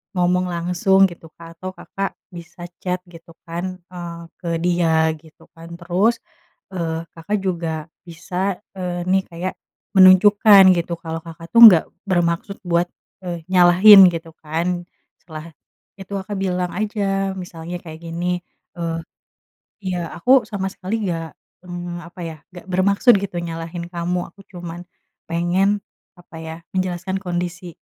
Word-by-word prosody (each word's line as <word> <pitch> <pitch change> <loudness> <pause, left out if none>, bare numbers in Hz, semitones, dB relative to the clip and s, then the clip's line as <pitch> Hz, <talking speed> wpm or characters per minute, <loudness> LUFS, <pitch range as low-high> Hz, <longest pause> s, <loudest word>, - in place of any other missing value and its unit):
ngomong 180 0 +2
langsung 180 +3 +2
gitu 165 -1 -12
Kak 165 0 -13
atau 185 0 -5
Kakak 195 0 -4 0.2
bisa 175 -1 -10 0.2
chat 180 0 -1
gitu 165 0 -14 0.2
kan, 180 +2 -4
eee, 170 -2 -7 0.2
ke 170 - -5
dia 165 -2 +2
gitu 160 0 -20
kan. 165 0 -11
Terus, 185 +7 +1 0.5
eee, 165 -3 -3
Kakak 190 +6 -2
juga 165 -4 -3 0.2
bisa, 180 +3 -3 0.2
eee, 180 -2 -3
nih 190 +1 +2
kayak 175 +2 -5 0.4
menunjukkan 195 +2 +8
gitu, 170 0 -2
kalau 165 0 -5
Kakak 165 0 -10
tuh 235 - +5
nggak 175 -7 +7 0.2
bermaksud 175 +1 0
buat, 175 -1 +1 0.4
eee, 175 -2 -5
nyalahin 185 +2 +8
gitu 165 -1 -6
kan. 175 +3 -2 0.3
Setelah 160 0 -10 0.5
itu 195 +1 -11
Kakak 195 +1 -4
bilang 180 -2 -1
aja 195 -2 -1
misalnya 175 -2 -7
kayak 160 -2 -9
gini, 175 +2 -2 0.4
eee, 165 -1 -2 0.9
"Iya 185 -1 -2 0.2
aku 255 +9 +5
sama 200 -3 -3
sekali 190 +2 -5
nggak, 165 -2 -3 0.4
eee, 175 -1 -6
apa 175 - -13
ya, 160 -1 -7 0.2
nggak 175 - -11
bermaksud 200 +6 +4
gitu 195 -2 -5
nyalahin 165 +1 -5
kamu, 175 0 -2
aku 200 - -21
cuman 175 -1 -7 0.5
pengen 185 +4 +1 0.4
apa 175 -1 -15
ya 160 0 -6 0.2
menjelaskan 185 0 -2
kondisi, 175 -1 -4
175 Hz, 140 wpm, -21 LUFS, 170-190 Hz, 0.9 s, menunjukkan